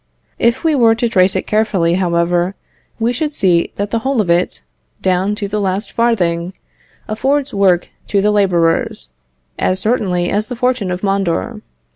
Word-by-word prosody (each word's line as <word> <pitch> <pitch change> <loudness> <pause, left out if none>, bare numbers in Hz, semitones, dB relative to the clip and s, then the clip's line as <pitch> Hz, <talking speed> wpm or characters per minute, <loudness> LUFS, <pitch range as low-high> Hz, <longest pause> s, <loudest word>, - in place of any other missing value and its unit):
If 235 0 +1
we 325 -1 +2
were 230 -5 +4
to 235 +1 0
trace 190 -4 +3
it 190 - -1
carefully, 205 -6 +1
however, 175 +1 0 0.4
we 230 +2 +1
should 300 +4 -2
see 175 -4 +2
that 205 0 -3
the 230 - +1
whole 265 +2 -1
of 185 -5 +1
it, 175 +1 0 0.4
down 190 +2 0
to 205 -1 -4
the 210 +1 -2
last 195 +1 -2
farthing, 180 -7 0 0.5
affords 270 +6 -1
work 190 -3 +2 0.2
to 200 - +1
the 210 +2 +2
labourers, 170 - +1 0.5
as 185 0 +1
certainly 190 -5 0
as 210 +1 0
the 245 - -5
fortune 250 -5 0
of 180 +2 -4
Mondor. 195 - -1
200 Hz, 165 wpm, -16 LUFS, 180-225 Hz, 0.5 s, were